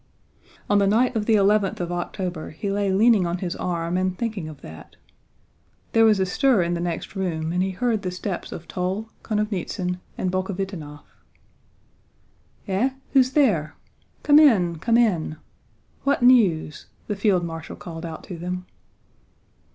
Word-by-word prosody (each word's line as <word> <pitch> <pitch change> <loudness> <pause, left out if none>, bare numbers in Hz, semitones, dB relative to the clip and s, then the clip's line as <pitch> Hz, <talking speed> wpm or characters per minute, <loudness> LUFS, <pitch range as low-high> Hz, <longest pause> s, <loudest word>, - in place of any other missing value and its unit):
On 205 0 +3
the 200 - +3
night 240 +5 +2
of 210 -2 -1
the 225 - +5
eleventh 205 -1 +2
of 175 -1 -3
October 175 -1 -4
he 195 +6 -4
lay 200 -1 0
leaning 205 -1 +4
on 170 +1 -2
his 180 -1 -4
arm 170 0 -2
and 185 0 -1
thinking 220 -9 -3
of 150 -3 -12
that. 80 0 -12 1.0
There 225 0 +5
was 215 -3 +4
a 190 - +2
stir 235 +1 +2
in 170 +1 -1
the 170 - -2
next 175 +3 -4
room 165 -4 -2
and 180 - +1
he 190 - +1
heard 220 +3 -1
the 185 - -3
steps 180 0 -5
of 170 - -8
Toll, 190 +5 -3
Konovnítsyn, 195 -4 -2 0.2
and 185 - -1
Bolkhovítinov. 185 -6 -4 1.7
"Eh, 195 +7 +1 0.2
who's 260 -1 +4
there? 200 - +2 0.5
Come 295 0 +7
in, 185 - +4
come 230 +6 +2
in! 175 -10 +1 0.7
What 280 -2 +1
news?" 195 -12 +3 0.2
the 210 - -3
field 195 -3 +2
marshal 165 -2 -7
called 165 -1 -8
out 165 -2 -7
to 180 -5 -8
them. 180 +1 -4
185 Hz, 160 wpm, -23 LUFS, 175-215 Hz, 1.7 s, Come